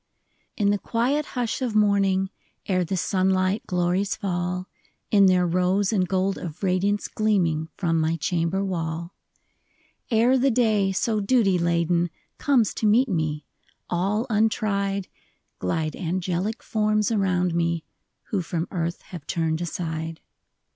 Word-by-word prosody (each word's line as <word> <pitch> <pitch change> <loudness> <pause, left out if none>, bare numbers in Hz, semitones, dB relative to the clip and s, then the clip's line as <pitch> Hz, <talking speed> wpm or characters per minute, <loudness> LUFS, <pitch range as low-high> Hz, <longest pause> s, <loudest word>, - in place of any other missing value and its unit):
N 205 -2 +3
the 205 - 0
quiet 260 +8 0
hush 240 +1 -1
of 240 -4 -1
morning, 195 -2 +3 0.3
Ere 185 -2 +1
the 175 +3 -2
sunUght 185 +2 +1
glories 180 +4 0
fall, 180 -2 -2 0.4
In 200 -2 +6
their 180 -1 +4
rose 185 +4 +1
and 185 -3 +2
gold 190 +1 0
of 170 +2 -7
radiance 195 +2 +1
Gleaming 170 -8 0
from 165 -3 +1
my 160 +1 +1
chamber 170 +4 -1
wall; 170 -1 -3 1.0
Ere 240 +3 +4
the 270 +2 +3
day, 220 -5 +2
so 215 +3 0
duty 200 -3 +3
laden, 170 0 +1 0.3
Comes 250 -8 +2
to 220 - 0
meet 240 +5 +4
me, 155 -5 -1 0.5
all 195 +6 0
untried, 205 -3 0 0.5
Glide 155 - -1
angelic 185 +4 -2
forms 215 -1 +1
around 180 -4 +1
me 170 -1 0 0.5
Who 200 - 0
from 165 0 -3
earth 170 -2 -3
have 170 -6 -10
turned 160 -1 -1
aside. 160 -1 -4
190 Hz, 135 wpm, -25 LUFS, 170-210 Hz, 1.0 s, In